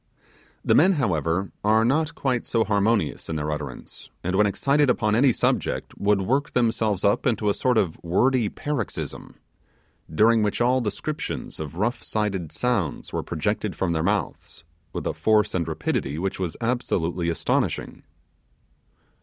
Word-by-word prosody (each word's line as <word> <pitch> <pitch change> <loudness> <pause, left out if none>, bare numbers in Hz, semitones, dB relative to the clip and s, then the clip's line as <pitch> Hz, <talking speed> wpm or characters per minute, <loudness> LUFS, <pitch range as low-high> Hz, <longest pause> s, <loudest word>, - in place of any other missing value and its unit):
The - - +4
men 185 +6 +6
however, 90 - 0
are 110 +2 +4
not 155 +5 +1
quite 130 -3 -1
so 115 -1 +2
harmonious 100 -3 0
in 80 - -2
their 75 0 -2
utterance, 75 -3 -7
and 90 +2 -1
when 105 +1 +4
excited 140 +7 +2
upon 105 -4 +2
any 130 +4 +5
subject, - - -1
would 100 -1 +2
work 135 +8 0
themselves 110 -5 +1
up 100 +6 +2
into 110 -4 +1
a - - 0
sort 125 +1 +1
of 90 -7 0
wordy 115 +6 +2
paroxysm, 145 -7 -5 0.8
during 110 +7 +4
which 105 -1 0
all 125 +2 +3
descriptions 145 +7 -4
of 80 0 -6
rough 120 +4 -1
sided 100 -7 -2
sounds 100 - -2
were - - -1
projected - - -2
from 90 -3 0
their 80 - 0
mouths, 100 0 -2 0.3
with - - -5
a - - -1
force 105 -1 +2
and 85 -3 -1
rapidity 80 -3 -2
which 95 +3 -3
was 90 -3 -3
absolutely 90 -8 -1
astonishing. 80 - -1
105 Hz, 155 wpm, -24 LUFS, 85-120 Hz, 0.8 s, men